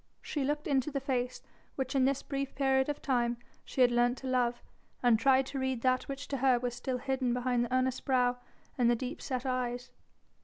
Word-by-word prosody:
She 290 - -2
looked 295 +2 -1
into 275 -1 +1
the 280 -2 -2
face 250 -2 -2 0.3
which 265 -1 -2
in 265 -2 +3
this 275 0 0
brief 275 -1 -4
period 265 0 +2
of 290 - -4
time 240 -3 +1 0.3
she 260 - -2
had 245 -1 +6
learnt 240 +1 +2
to 265 - -7
love, 245 -2 +1 0.4
and 235 -3 +5
tried 265 +2 +4
to 270 +1 -5
read 260 -2 -2
that 255 0 +2
which 275 +1 -6
to 275 - -1
her 260 -1 +4
was 245 0 -2
still 250 +1 -3
hidden 260 -1 -1
behind 245 -1 +1
the 240 - -9
earnest 255 0 0
brow 250 -2 +2 0.4
and 240 -1 +4
the 240 - +4
deep 255 +4 -5
set 255 -1 -3
eyes. 250 -1 -2
255 Hz, 215 wpm, -31 LUFS, 245-270 Hz, 0.4 s, had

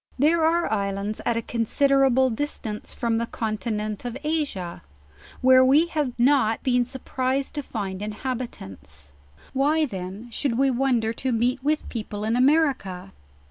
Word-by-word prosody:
There 315 +5 +3
are 335 -1 +2
islands 200 0 -2
at 235 - +1
a 230 - -2
considerable 265 +2 +2
distance 225 -4 -4
from 230 -1 -1
the 235 - -2
con 215 -2 -3
tinent 215 -2 -3
of 245 +1 -4
Asia, 290 - -2 0.6
where 260 0 +7
we 280 +5 +5
have 295 -7 -2
dot 245 -3 +3
been 250 -1 +2
surprised 260 +1 -2
to 295 - -2
find 200 -7 -5
in 210 0 -4
habitants; 95 - -6 0.4
why 300 +4 +2
then 195 +1 -7
should 235 0 -1
we 270 0 +3
wonder 240 -3 +1
to 260 +3 -2
meet 245 +3 0
with 305 +2 0
people 210 -3 -5
in 220 +2 0
America? 255 - +1
245 Hz, 150 wpm, -24 LUFS, 215-275 Hz, 0.6 s, where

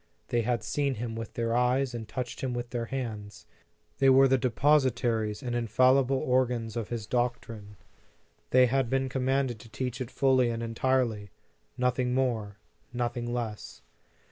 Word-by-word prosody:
They 120 - +1
had 120 0 -1
seen 140 -2 -1
Him 115 0 -5
with 115 -1 -7
their 115 0 -1
eyes 125 +1 +1
and 115 -2 -6
touched 125 0 -5
Him 130 -2 -2
with 120 -1 -5
their 120 -1 -2
hands. 110 -5 -6 0.5
They 135 - +5
were 135 +1 +7
the 130 - +4
depositaries 120 -4 +1
and 120 -1 -3
infallible 130 +3 +3
organs 125 -3 0
of 115 -3 -3
His 115 -3 -4
doctrine. 115 -4 -3 0.7
They 130 0 +6
had 130 0 +1
been 135 0 0
commanded 130 -2 0
to 115 - -14
teach 125 +2 -4
it 125 - -4
fully 130 -3 +3
and 115 0 -3
entirely, 115 -3 0 0.5
nothing 125 0 0
more, 110 -6 -1 0.3
nothing 120 0 -2
less. 115 - -5
120 Hz, 155 wpm, -28 LUFS, 115-130 Hz, 0.7 s, were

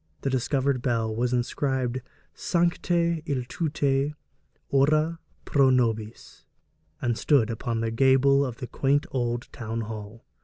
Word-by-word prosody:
The 135 - -1
discovered 130 +1 0
bell 115 -3 0
was 120 +2 0
inscribed 130 0 -1 0.3
'Sancte 170 -1 +1
Iltute, 140 +1 -1 0.5
ora 155 +4 +2 0.3
pro 140 -2 +4
nobis,' 115 -3 -1 0.6
and 120 -2 +1
stood 115 0 +2
upon 115 0 -2
the 115 0 -1
gable 135 +3 +4
of 125 -4 -4
the 130 - -5
quaint 140 +4 +1
old 120 -1 -2
town 115 0 -4
hall. 110 0 -8
130 Hz, 120 wpm, -26 LUFS, 115-140 Hz, 0.6 s, pro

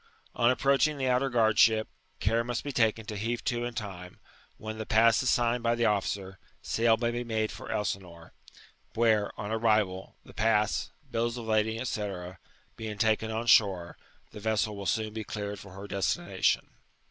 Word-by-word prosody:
On 120 - +4
approaching 140 +3 +2
the 130 -1 -1
outer 130 +2 +2
guard 110 -4 +2
ship, 110 -1 +5 0.3
care 115 +3 +1
must 120 0 -3
be 145 - -4
taken 110 -3 +1
to 105 -1 -6
heave 115 +3 -2
to 120 -1 -1
in 120 -1 -5
time; 90 -4 -7 0.4
when 110 0 -7
llie 110 - -5
pass 115 0 +4
is 130 - +1
signed 120 0 +2
by 115 0 +1
the 120 0 +1
officer, 100 -2 -1 0.2
s^l 115 -1 +2
may 120 -1 0
be 120 +1 -3
made 110 -2 -1
for - - -9
ElsinOre, 95 -4 -4 0.6
where, 110 -3 +3
on 105 0 -4
arrival, 110 -4 +1
the - - -14
pass, 105 -1 +1 0.2
bills 115 +1 -1
of 120 - -6
lading, 110 +2 0
&c., 110 -3 -2 0.7
being 110 -2 -6
taken 110 +1 +1
on 110 +1 -3
shore, 95 -7 +4 0.4
the - - -9
vessel 110 -1 0
will 100 -1 -5
soon 110 -1 -1
be 110 0 -4
cleared 105 -1 -5
for 100 -2 -12
her 100 +1 -8
destination." 95 -6 0
110 Hz, 180 wpm, -29 LUFS, 105-115 Hz, 0.7 s, ship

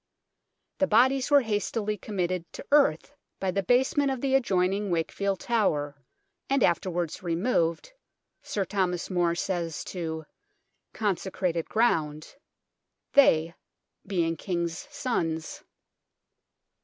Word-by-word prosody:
The 285 - +3
bodies 255 +4 +3
were 285 -1 +6
hastily 215 -1 -1
committed 185 -4 -3
to - - -8
earth 280 - +3 0.3
by 190 -1 0
the 195 - 0
basement 265 - +2
of 265 -2 -2
the 270 +1 -1
adjoining 195 -5 +1
Wakefield 190 +3 -1
Tower, 150 - 0 0.5
and 275 -2 +2
afterwards 175 -1 0
removed, 170 - 0 0.5
Sir 200 -2 -2
Thomas 185 -2 -1
More 175 -2 +1
says 170 -3 -2
to 160 -3 -5 0.7
"consecrated 185 -4 -2
ground," 155 - 0 0.8
they 165 - +5 0.5
being 165 -4 0
King's 170 -1 -3
sons. 165 -10 -3
185 Hz, 105 wpm, -27 LUFS, 170-225 Hz, 0.8 s, were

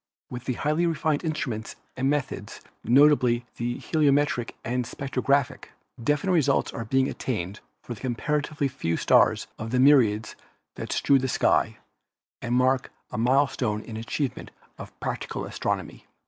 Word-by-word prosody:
With 125 0 -7
the 130 - -1
highly 155 +7 0
refined 160 -2 0
instruments 130 -9 -3 0.2
and 135 +1 0
meth 145 -2 0
ods, - - -9 0.2
notably 125 -3 +4
the 120 +1 -2
heliometric 145 -5 +1
and 125 +1 0
spectrographic, 135 +1 -1 0.4
defi 150 +5 +1
nite 190 - +2
results 160 -6 +2
are 115 - -5
being 130 +3 +2
attained 100 -5 -4 0.2
for 120 - -6
a - - -11
comparatively 145 +4 -1
few 85 -11 -2
stars - - +4
of 110 - -4
the 125 +2 +1
myriads 115 -6 +4 0.4
that - - -6
strew 140 -1 +3
the 130 - -1
sky - - +2 0.6
and 120 0 -1
mark 130 +1 +2 0.2
a - - -4
mile 130 +5 +4
stone 110 -5 -2
in 110 - -8
achievement 120 +4 -3 0.3
of - - -11
practical - - -4
astronomy. - - -4
130 Hz, 150 wpm, -26 LUFS, 120-145 Hz, 0.6 s, notably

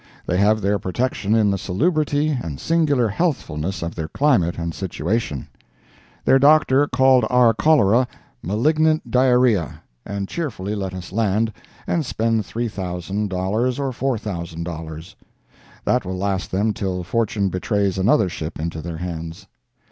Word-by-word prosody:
They 90 - 0
have 105 +2 +3
their 100 +1 +1
protection 110 +1 -1
in 105 -3 +3
the 100 - -1
salubrity 150 - +1
and 85 - -3
singular 150 -7 +2
healthfulness 95 - -2
of 85 - -4
their 80 -2 -4
climate 115 - +2
and 85 -1 -3
situation. 90 - -3 0.8
Their 135 - +5
Doctor 145 -1 +5
called 130 -3 +4
our 125 -2 +5
cholera 125 -3 +4 0.3
"malignant 155 - +1
diarrhea," 125 - +2 0.2
and 100 -1 -4
cheerfully 105 - -4
let 95 -3 -4
us 90 -1 -8
land 110 +1 +1 0.3
and 170 - 0
spend 115 -4 0
$3,000 100 +3 -2
or 135 -2 -1
$4,000. 85 -4 -6 0.7
That 125 - +2
will 95 0 -4
last 95 0 -2
them 105 +3 0
till 95 -2 -3
fortune 105 0 0
betrays 95 +1 -1
another 100 +1 +3
ship 80 -3 -6
into 80 0 -3
their 85 0 -6
hands. 85 -1 -6
105 Hz, 135 wpm, -21 LUFS, 90-125 Hz, 0.8 s, Their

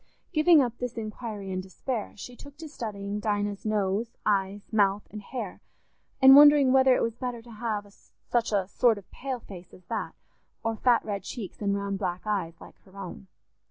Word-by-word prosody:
Giving 310 -2 +6
up 240 -1 -4
this 245 -1 -4
inquiry 215 -3 -5
in 185 0 -2
despair, 205 +5 -5
she 245 +4 -9
took 285 +3 -13
to 320 +1 -8
studying 205 -7 -5
Dinah's 205 -1 -2
nose, 215 +2 -1
eyes, 200 0 -1
mouth, 205 -1 +2
and 210 - -7
hair, 215 -2 -6 0.6
and 265 0 +9
wondering 290 -2 +8
whether 265 -1 +6
it - - +1
was 230 - -1
better 245 -2 -5
to 240 - -14
have 215 -2 -3 0.4
such 235 -2 0
a 195 -3 +1
sort 230 +2 +3
of 200 - -13
pale 260 -2 -5
face 185 -4 -12
as 180 - -19
that, - - -3 0.5
or 225 0 -1
fat 240 +1 +3
red 200 -2 -3
cheeks 200 +1 -7
and 200 -1 +1
round 200 -1 -3
black 180 -3 -3
eyes 185 -6 -2
like - - -14
her 195 0 -19
own. 195 0 -8
215 Hz, 190 wpm, -27 LUFS, 200-245 Hz, 0.6 s, and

